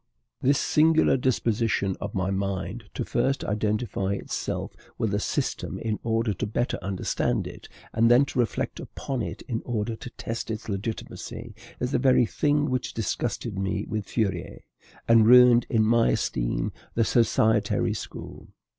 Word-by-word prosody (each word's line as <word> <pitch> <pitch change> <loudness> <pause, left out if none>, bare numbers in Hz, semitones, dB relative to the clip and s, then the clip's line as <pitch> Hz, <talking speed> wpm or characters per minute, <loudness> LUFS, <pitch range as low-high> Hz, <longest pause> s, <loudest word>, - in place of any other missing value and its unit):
This 140 +2 +3
singular 160 +1 +4
disposition 115 -6 +1
of 100 - -5
my 95 0 0
mind 95 -1 -3
to - - -2
first 135 0 0
identify 105 -2 -1
itself 100 - -4 0.2
with 110 -3 -1
a 105 - +1
system - - -2
in 110 -2 -2
order 115 -1 0
to 90 - -3
better 120 +4 -1
understand 95 -1 -1
it, - - -10 0.2
and 115 +1 +4
then 125 +4 +6
to 130 - -4
reflect 120 - -1
upon 135 -3 -4
it - - -5
in 115 -3 -3
order 115 -1 -2
to 125 - -9
test 115 -1 -5
its 110 -1 -4
legitimacy, 110 +2 -5 0.3
is 125 - -1
the - - +2
very 130 -2 +4
thing 145 +5 +1
which 130 -1 -2
disgusted 100 -2 -2
me 100 +1 -1
with 110 -2 -4
Fourier, 110 -5 -2 0.5
and 115 -1 +6
ruined 125 0 +7
in 110 -2 +3
my 115 +1 +4
esteem - - -1 0.2
the 115 - +3
societary 110 -2 +2
school. - - -8
115 Hz, 155 wpm, -26 LUFS, 105-120 Hz, 0.5 s, ruined